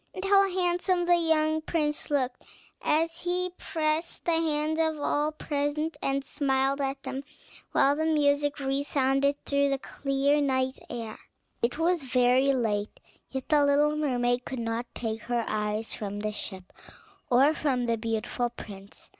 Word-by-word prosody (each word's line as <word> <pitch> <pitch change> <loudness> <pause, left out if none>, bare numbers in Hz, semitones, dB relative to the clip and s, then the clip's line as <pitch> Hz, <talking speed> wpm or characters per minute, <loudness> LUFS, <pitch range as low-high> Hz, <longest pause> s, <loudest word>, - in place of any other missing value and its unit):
And 375 - -4
how 395 0 +5
handsome 355 0 +1
the 350 0 +5
young 315 -2 +2
prince 300 -2 -1
looked, 260 -4 0 0.4
as 330 +2 +1
he 360 +1 0
pressed 315 0 -2
the 340 - +2
hands 315 -1 +1
of 320 -1 +1
all 295 +1 0
present 300 +1 -2
and 275 0 -1
smiled 270 0 0
at 270 0 -2
them, 270 +1 -5 0.5
while 280 +1 +4
the 315 +1 0
music 290 -2 +2
resounded 275 0 +1
through 280 0 +2
the 275 - +1
clear 275 +2 0
night 260 -1 0
air. 225 -2 -6 0.4
It 235 +4 0
was 340 +1 +2
very 255 +1 +3
late; 215 -5 -1 0.3
yet 265 -1 -5
the 300 -2 +5
little 290 +1 +3
mermaid 245 -4 0
could 260 - -5
not 230 +1 -2
take 225 -1 -3
her 240 0 -1
eyes 210 +1 -1
from 205 -1 -5
the 215 0 -1
ship, 190 -3 -7 0.6
or 270 +5 +5
from 265 -6 0
the 230 -1 +1
beautiful 225 +2 -2
prince. 200 -4 -11
280 Hz, 155 wpm, -28 LUFS, 245-310 Hz, 0.6 s, how